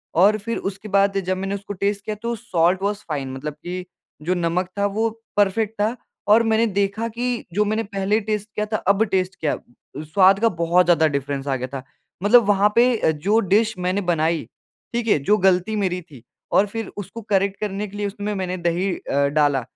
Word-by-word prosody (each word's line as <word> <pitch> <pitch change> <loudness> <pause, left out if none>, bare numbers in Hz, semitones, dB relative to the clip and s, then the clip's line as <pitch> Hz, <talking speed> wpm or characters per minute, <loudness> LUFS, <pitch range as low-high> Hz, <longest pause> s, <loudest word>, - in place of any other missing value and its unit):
और 205 +5 +5
फिर 230 +3 -4
उसके 195 +2 -5
बाद 195 0 +3
जब 185 0 0
मैंने 195 +1 -2
उसको 200 +1 -6
टेस्ट 200 +1 -1
किया 215 - -3
तो 235 0 -1
साल्ट 180 -1 +1
वाज 205 0 0
फाइन 135 -3 -3
मतलब 145 +3 -5
की 180 +4 -6 0.4
जो 180 +3 +1
नमक 175 +1 0
था 200 - +2
वो 225 +1 +2 0.3
परफेक्ट 205 +2 +2
था 220 +4 +1 0.3
और 225 +2 +6
मैंने 225 +1 +2
देखा 200 +3 -1
कि 245 +1 -3
जो 210 +2 +2
मैंने 215 +2 0
पहले 200 +1 0
टेस्ट 210 0 -3
किया 210 - 0
था, 215 0 -2
अब 200 +3 +2
टेस्ट 185 -2 -1
किया, 155 - 0 0.5
स्वाद 190 +5 +4
का 230 +1 +3
बहुत 170 0 +2
ज़्यादा 165 -2 +4
डिफरेंस 140 -1 -3
आ 135 - +1
गया 130 0 -4
था। 130 0 -7 0.4
मतलब 235 +3 +6
वहाँ 205 0 +4
पे 245 +1 +5
अ, - - +3
जो 195 +9 +1
डिश 215 +2 +2
मैंने 185 +3 0
बनाई 165 -3 0 0.5
ठीक 235 -1 -1
है, 180 - +4
जो 205 +10 +2
गलती 190 +2 +2
मेरी 185 -3 -1
थी 145 -8 -16 0.3
और 200 - +5
फिर 225 +1 -5
उसको 205 +3 -7
करेक्ट 195 0 +1
करने 210 0 -2
के 205 - -10
लिए 205 0 -1
उसमें 205 +1 -4
मैंने 185 -1 -3
दही 175 +2 0
अ, 140 0 0
डाला 145 -2 +2
195 Hz, 205 wpm, -22 LUFS, 175-210 Hz, 0.5 s, और